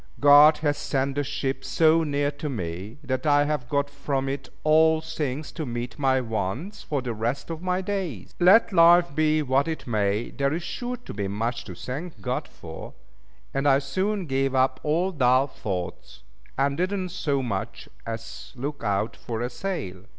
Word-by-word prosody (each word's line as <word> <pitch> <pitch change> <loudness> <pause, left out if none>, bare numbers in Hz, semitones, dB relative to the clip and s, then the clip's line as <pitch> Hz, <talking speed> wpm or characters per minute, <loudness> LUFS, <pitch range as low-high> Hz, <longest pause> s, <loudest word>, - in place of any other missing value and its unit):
God 145 +2 +8
has 145 0 +1
sent 135 0 -1
the 145 +1 -1
ship 135 -1 -3
so 165 0 +3
near 145 -1 0
to 150 +1 -5
me, 95 - -5
that 130 +2 -2
I 145 0 +5
have 145 -5 -2
got 140 0 +1
from 140 -1 -2
it 135 -1 -4
all 160 +1 +5
things 150 -2 -4
to 160 - -5
meet 120 0 -5
my 135 -2 +3
wants 120 - -3
for 145 -4 -3
the 120 -2 -3
rest 120 +8 -3
of 165 0 -5
my 180 0 0
days. 185 - -4
Let 195 +4 +6
life 170 -2 +6
be 155 0 +2
what 135 +2 +2
it 160 -1 -4
may, 105 -1 0
there 140 0 0
is 170 +2 -3
sure 245 +7 -4
to 245 - -10
be 100 -1 -2
much 115 +4 -2
to 90 - -8
thank 130 - -6
God 95 - -3
for; - - -10 0.6
and 135 +1 0
I 135 -1 +6
soon 185 +8 -1
gave 135 -1 0
up 130 0 +2
all 170 +5 +1
dull 130 -4 +3
thoughts, 90 - -6 0.3
and 140 +1 +1
did 185 +3 0
not 185 -3 -2
so 145 -7 -1
much 100 -6 -4 0.2
as 115 0 -7
look 145 +4 -5
out 100 +2 0
for 115 -1 -5
a 120 +1 -2
sail. 100 - -5
140 Hz, 185 wpm, -25 LUFS, 120-160 Hz, 0.6 s, God